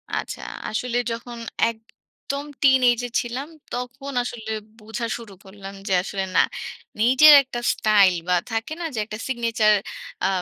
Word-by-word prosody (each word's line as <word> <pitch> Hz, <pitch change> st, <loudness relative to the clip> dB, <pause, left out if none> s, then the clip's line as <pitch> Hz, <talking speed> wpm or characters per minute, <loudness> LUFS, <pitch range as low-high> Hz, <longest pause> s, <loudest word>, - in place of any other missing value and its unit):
আচ্ছা। -, -, -4 dB, 0.3 s
আসলে 240 Hz, +2 st, -2 dB
যখন 235 Hz, +1 st, -6 dB, 0.3 s
একদম 230 Hz, +5 st, -8 dB, 0.2 s
টিনএজ 255 Hz, -3 st, +5 dB
এ -, -, -13 dB
ছিলাম, 250 Hz, +4 st, -5 dB, 0.3 s
তখন 255 Hz, +3 st, -5 dB
আসলে 230 Hz, -2 st, -6 dB, 0.3 s
বুঝা 220 Hz, +2 st, -5 dB
শুরু 230 Hz, -4 st, -11 dB
করলাম 195 Hz, 0 st, -10 dB
যে 195 Hz, -, +1 dB
আসলে 195 Hz, 0 st, -3 dB
না। -, -, +6 dB, 0.6 s
নিজের 260 Hz, +6 st, +8 dB
একটা 255 Hz, -2 st, -5 dB
স্টাইল 205 Hz, -3 st, +4 dB, 0.2 s
বা 180 Hz, -, +4 dB, 0.2 s
থাকে 225 Hz, +7 st, -2 dB
না? 335 Hz, -, -2 dB
যে -, -, -1 dB
একটা 215 Hz, 0 st, -7 dB
সিগনেচার 230 Hz, -4 st, +2 dB, 0.5 s
আ -, -, +4 dB
235 Hz, 145 wpm, -23 LUFS, 215-250 Hz, 0.6 s, নিজের